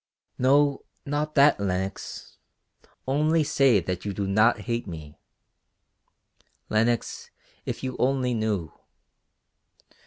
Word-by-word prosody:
"No, 140 Hz, +2 st, +3 dB, 0.2 s
not 150 Hz, +2 st, -2 dB
that, 140 Hz, -3 st, +5 dB
Lenox. 95 Hz, 0 st, -4 dB, 0.7 s
Only 155 Hz, +4 st, +2 dB
say 135 Hz, -6 st, +3 dB
that 90 Hz, 0 st, -4 dB
you 100 Hz, -, -3 dB
do 100 Hz, -, -2 dB
not 110 Hz, +4 st, +3 dB
hate 120 Hz, -2 st, -3 dB
me. 80 Hz, -4 st, -9 dB, 1.5 s
Lenox, 115 Hz, +2 st, 0 dB, 0.4 s
if -, -, -4 dB
you 130 Hz, -1 st, -3 dB
only 130 Hz, -1 st, +1 dB
knew. 105 Hz, -8 st, -1 dB
120 Hz, 100 wpm, -26 LUFS, 100-140 Hz, 1.5 s, that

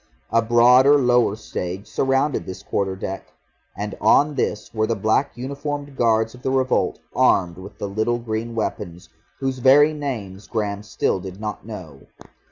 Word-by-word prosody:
A 115 Hz, -, +4 dB
broader 125 Hz, +5 st, +6 dB
lower 125 Hz, -5 st, +3 dB
stage 95 Hz, -2 st, -5 dB
surrounded 135 Hz, +6 st, 0 dB
this 95 Hz, -, -7 dB
quarter 95 Hz, -1 st, -1 dB
deck, 95 Hz, 0 st, -6 dB, 0.4 s
and 105 Hz, 0 st, -4 dB
on 145 Hz, +8 st, +4 dB
this 115 Hz, -5 st, -3 dB
were 110 Hz, -1 st, 0 dB
the 115 Hz, -, 0 dB
black 110 Hz, +7 st, 0 dB
uniformed 140 Hz, +2 st, -5 dB
guards 110 Hz, -2 st, +2 dB
of 125 Hz, -, -14 dB
the 130 Hz, -, -2 dB
revolt 130 Hz, -1 st, +1 dB, 0.2 s
armed 90 Hz, -2 st, +2 dB
with 95 Hz, +2 st, -11 dB
the 100 Hz, -, -4 dB
little 110 Hz, +4 st, 0 dB
green 115 Hz, 0 st, -4 dB
weapons 95 Hz, -5 st, -4 dB, 0.3 s
whose 135 Hz, -1 st, -2 dB
very 145 Hz, +4 st, +6 dB
names 110 Hz, -10 st, -5 dB
Graham 105 Hz, -3 st, -2 dB
still 105 Hz, -2 st, -1 dB
did 95 Hz, +1 st, -9 dB
not 105 Hz, 0 st, -6 dB
know. 85 Hz, -11 st, -10 dB
115 Hz, 160 wpm, -22 LUFS, 100-130 Hz, 0.4 s, broader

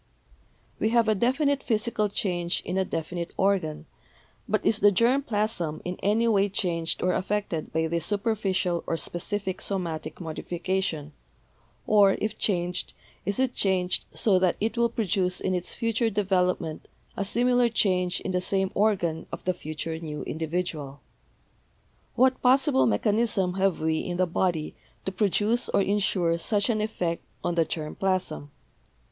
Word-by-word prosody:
We 220 Hz, -, +2 dB
have 230 Hz, -1 st, +3 dB
a 215 Hz, -, +4 dB
definite 270 Hz, +6 st, +1 dB
physical 215 Hz, -3 st, 0 dB
change 175 Hz, -4 st, -1 dB
in 180 Hz, -, -3 dB
a 190 Hz, -, +2 dB
definite 170 Hz, 0 st, -4 dB
organ, 190 Hz, -6 st, 0 dB, 0.6 s
but -, -, 0 dB
is 215 Hz, -, +3 dB
the 205 Hz, +1 st, +6 dB
germ 235 Hz, +8 st, +3 dB
plasm 210 Hz, -, -1 dB
in 180 Hz, +1 st, -3 dB
any 220 Hz, +4 st, +2 dB
way 205 Hz, -2 st, +3 dB
changed 170 Hz, -4 st, 0 dB
or 180 Hz, 0 st, +2 dB
affected 185 Hz, -4 st, -2 dB
by 160 Hz, +1 st, +1 dB
this 165 Hz, 0 st, -1 dB
super 215 Hz, +2 st, 0 dB
ficial 185 Hz, -4 st, -1 dB
or 165 Hz, -, 0 dB
specific 190 Hz, +4 st, -3 dB
somatic 165 Hz, -5 st, -3 dB
modification, 170 Hz, -2 st, -3 dB, 0.7 s
or, 205 Hz, -2 st, +5 dB
if 215 Hz, 0 st, -3 dB
changed, 180 Hz, -3 st, -1 dB, 0.3 s
is 200 Hz, -, 0 dB
it 260 Hz, -1 st, +1 dB
changed 185 Hz, -2 st, +1 dB
so 195 Hz, -4 st, +2 dB
that 185 Hz, -1 st, +2 dB
it 220 Hz, +3 st, -1 dB
will 235 Hz, 0 st, +2 dB
produce 185 Hz, -5 st, 0 dB
in 190 Hz, -, -1 dB
its 180 Hz, -1 st, -2 dB
future 230 Hz, 0 st, 0 dB
develop 190 Hz, -3 st, +1 dB
ment 160 Hz, -2 st, -7 dB, 0.3 s
a -, -, -1 dB
similar 245 Hz, +3 st, +2 dB
change 180 Hz, -5 st, +1 dB
in 190 Hz, -, -3 dB
the 180 Hz, 0 st, 0 dB
same 190 Hz, +1 st, 0 dB
organ 175 Hz, -6 st, +1 dB
of -, -, -6 dB
the 185 Hz, -, +1 dB
future 160 Hz, -1 st, -5 dB
new 150 Hz, -3 st, -5 dB
individual? 160 Hz, -3 st, -3 dB, 1.1 s
What 260 Hz, +1 st, +3 dB
possible 250 Hz, -, +4 dB
mechanism 195 Hz, -, +1 dB
have 190 Hz, -1 st, +1 dB
we 160 Hz, 0 st, +1 dB
in 175 Hz, -1 st, -3 dB
the 185 Hz, -, +3 dB
body 170 Hz, -2 st, -1 dB, 0.3 s
to 190 Hz, -, -1 dB
produce 210 Hz, +5 st, +1 dB
or -, -, +3 dB
insure 190 Hz, -4 st, +1 dB
such 205 Hz, +5 st, +1 dB
an 215 Hz, -2 st, 0 dB
effect 180 Hz, -6 st, -2 dB, 0.2 s
on 175 Hz, -, 0 dB
the 165 Hz, -1 st, +2 dB
germ 155 Hz, -1 st, -4 dB
plasm? 185 Hz, -6 st, -1 dB
190 Hz, 155 wpm, -26 LUFS, 170-210 Hz, 1.1 s, the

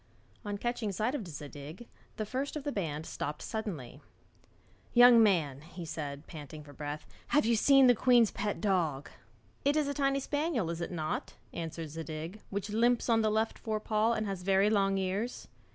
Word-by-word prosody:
On 205 Hz, -2 st, -3 dB
catching 240 Hz, -1 st, -2 dB
sight 215 Hz, +7 st, -1 dB
of 230 Hz, -10 st, -4 dB
Zadig, 150 Hz, +6 st, -9 dB, 0.3 s
the 215 Hz, -, -2 dB
first 265 Hz, +7 st, -3 dB
of 300 Hz, -, -4 dB
the 290 Hz, -, -2 dB
band 160 Hz, -, -3 dB
stopped 150 Hz, -1 st, -4 dB
suddenly. 160 Hz, -, -5 dB, 0.9 s
'Young 245 Hz, -1 st, +9 dB
man,' 160 Hz, -10 st, +2 dB
he 170 Hz, +2 st, -9 dB
said, 145 Hz, -2 st, -5 dB
panting 150 Hz, -1 st, -9 dB
for 145 Hz, -1 st, -13 dB
breath, 145 Hz, +2 st, -5 dB, 0.2 s
'have 295 Hz, -5 st, +3 dB
you 230 Hz, +1 st, +3 dB
seen 275 Hz, +4 st, +6 dB
the 245 Hz, -, +7 dB
queen's 240 Hz, -1 st, +4 dB
pet 205 Hz, 0 st, -2 dB
dog?' 170 Hz, -9 st, 0 dB, 0.5 s
'It 285 Hz, +1 st, +3 dB
is 305 Hz, -2 st, +2 dB
a 285 Hz, -, -1 dB
tiny 275 Hz, -1 st, +1 dB
spaniel, 285 Hz, -, -1 dB
is 170 Hz, 0 st, -5 dB
it -, -, -3 dB
not?' 155 Hz, -3 st, -3 dB, 0.2 s
answered 165 Hz, -1 st, -5 dB
Zadig, 165 Hz, +5 st, -6 dB
'which 200 Hz, +1 st, -4 dB
limps 240 Hz, +3 st, +2 dB
on 225 Hz, -1 st, +4 dB
the 215 Hz, -, +2 dB
left 220 Hz, +1 st, 0 dB
fore 215 Hz, -1 st, -2 dB
paw, 215 Hz, +1 st, +1 dB
and 215 Hz, -1 st, -1 dB
has 195 Hz, -3 st, -4 dB
very 195 Hz, +2 st, +3 dB
long 195 Hz, -2 st, +2 dB
ears?' 195 Hz, +6 st, -2 dB
200 Hz, 185 wpm, -31 LUFS, 160-235 Hz, 0.9 s, Young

